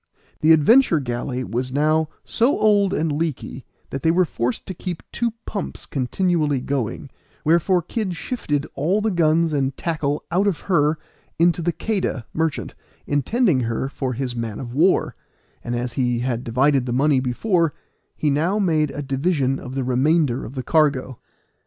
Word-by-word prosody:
The 155 - +4
Adventure 165 - +5
galley 125 0 -3
was 125 +2 -3
now 155 +3 +2 0.2
so 240 +5 +2
old 205 -3 +3
and 160 -5 0
leaky 145 -4 -3 0.3
that 135 - -4
they 160 - +2
were 180 +2 +4
forced 120 -5 -3
to 190 - -5
keep 180 -1 -6
two 235 -2 -1
pumps 200 - -5
continually 150 +1 0
going, 115 - -3 0.3
wherefore 170 +3 +3
Kid 190 0 -3
shifted 150 - -2
all 175 +9 +1
the 215 0 0
guns 165 -2 +2
and 135 -2 0
tackle 150 -3 -2
out 190 +4 +2
of 185 -7 0
her 155 -4 +2 0.4
into 170 +1 +3
the 175 +1 +1
Queda, 185 - -2
merchant, 160 -1 -2 0.3
intending 155 - +2
her 120 +2 -2
for 130 -2 -3
his 125 0 -3
man 115 -3 -4
of 120 -2 -7
war; 170 +7 +2 0.5
and 120 - -3
as 120 0 -3
he 125 -2 0
had 125 -1 -2
divided 130 +2 +2
the 120 - -1
money 140 +1 +3
before, 165 - 0 0.4
he 150 - +1
now 165 +8 +1
made 160 -7 +2
a 145 - -5
division 135 -1 0
of 130 0 -8
the 135 - -1
remainder 130 +1 +2
of 130 - -9
the 130 - -3
cargo. 140 -6 +1
150 Hz, 165 wpm, -22 LUFS, 130-170 Hz, 0.5 s, Adventure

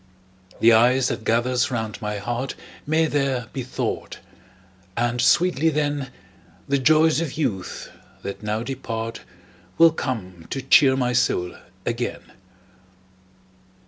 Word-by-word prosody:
The 115 0 +7
ice 125 +3 +4
that 110 - -4
gathers 120 +3 +1
round 110 -4 -4
my 105 -1 -3
heart 120 +5 -3 0.3
May 160 +2 +3
there 135 -5 0
be 135 - -3
thawed; 130 +1 -4 0.8
and 120 +1 0
sweetly, 165 +3 +3
then, 145 -3 -1 0.6
The 140 0 +1
joys 155 +3 +4
of 160 -5 -3
youth, 100 - -3 0.3
that 100 - -6
now 105 +1 -2
depart, 115 -3 -5 0.6
Will 165 0 +7
come 95 - -5
to 135 - -3
cheer 135 0 +5
my 125 -1 0
soul 90 -7 +1 0.3
again. - - -2
125 Hz, 120 wpm, -23 LUFS, 115-140 Hz, 0.8 s, The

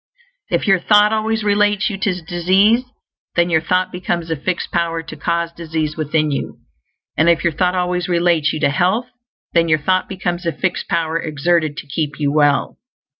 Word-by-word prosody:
If - - 0
your 195 -3 +4
thought 210 +3 +4
always 220 0 -1
relates 205 +1 +2
you 195 - -4
to 185 -3 -1
disease, 190 +8 +2 0.5
then 170 0 +2
your 160 -1 +3
thought 185 +2 0
becomes 175 -2 -3
a - - +1
fixed 175 +5 -3
power 165 -1 -1
to 160 -1 -9
cause 170 +2 -1
disease 160 -2 -3
within 155 0 0
you; 140 - -4 0.6
and 160 +2 +3
if 170 -1 +2
your 170 - +1
thought 180 +4 +1
always 180 0 -1
relates 170 -3 +2
you 155 - -4
to - - +3
health, 185 +11 +1 0.5
then 170 -1 +3
your 155 - +4
thought 185 +5 0
becomes 175 -2 -3
a - - +2
fixed 185 +5 -2
power 165 -1 0
exerted 155 0 0
to - - -7
keep 145 0 -3
you 145 -1 +1
well. 145 -1 +1
170 Hz, 185 wpm, -18 LUFS, 160-185 Hz, 0.6 s, your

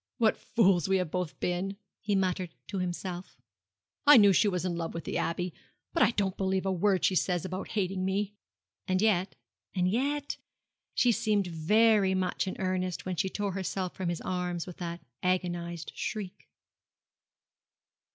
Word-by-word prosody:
'What 225 -4 +4
fools 190 -7 +2
we 190 - +4
have 180 -4 -2
both 180 -3 -3
been!' 185 +3 -1 0.2
he 205 -1 0
muttered 185 -2 0
to 195 - -2
himself, 180 0 -4 0.7
'I 295 -2 +10
knew 205 -3 +7
she 205 - +4
was 180 -2 0
in 175 -2 -1
love 165 -1 -4
with 165 - -4
the - - -2
Abbey; 175 +1 -1 0.4
but 335 - +1
I - - +7
don't 200 -5 0
believe 190 0 0
a 190 - +1
word 190 0 +2
she - - +3
says 180 -1 +1
about 185 +1 -4
hating 185 -1 0
me!' 195 +2 -1 0.5
And 185 0 +2
yet 195 -3 +2 0.4
and 180 -1 +2
yet 280 +8 0 0.6
she 245 - +4
had 235 - +3
seemed 215 -4 +2
very 195 +4 +3
much 185 +1 0
in 185 - -3
earnest 185 -1 -2
when 185 -1 -2
she 190 - 0
tore 205 0 -2
herself 190 -1 -3
from 185 -2 -3
his 170 - -3
arms 180 -2 -2
with 180 - -9
that 170 -1 -5 0.2
agonized 175 -2 -1
shriek. 200 -2 -5
185 Hz, 170 wpm, -30 LUFS, 180-200 Hz, 0.7 s, I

